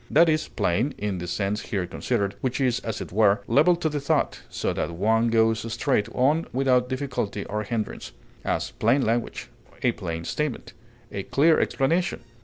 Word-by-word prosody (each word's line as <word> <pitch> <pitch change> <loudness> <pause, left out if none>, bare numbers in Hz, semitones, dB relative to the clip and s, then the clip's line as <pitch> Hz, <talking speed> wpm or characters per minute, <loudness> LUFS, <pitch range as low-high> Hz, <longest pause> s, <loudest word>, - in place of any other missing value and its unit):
That 165 +3 +5
is 155 0 +1
plain, 115 +11 0
in 100 -3 -2
the 90 - -5
sense 100 +3 -1
here 95 -4 -2
considered, 100 +2 -1
which 130 0 -1
is, 125 -3 +2
as 110 -2 -4
it - - -7
were, 100 0 +4
level 145 +9 +5
to 170 -1 -1
the 150 -1 -1
thought, 140 - 0
so - - -2
that - - -2
one 110 +7 +2
goes 115 0 +2
straight 110 -1 +1
on 150 +6 +2
without 125 -1 +2
difficulty 125 -7 -3
or 105 +1 -3
hindrance; 110 0 -4 0.3
as, - - -1
plain 125 +5 +2
language; 115 +1 -1 0.3
a - - +4
plain 80 0 -5
statement; 150 -5 -3 0.4
a 100 - -3
clear 155 +10 +3
explanation. 165 +5 0
115 Hz, 175 wpm, -25 LUFS, 105-140 Hz, 0.4 s, That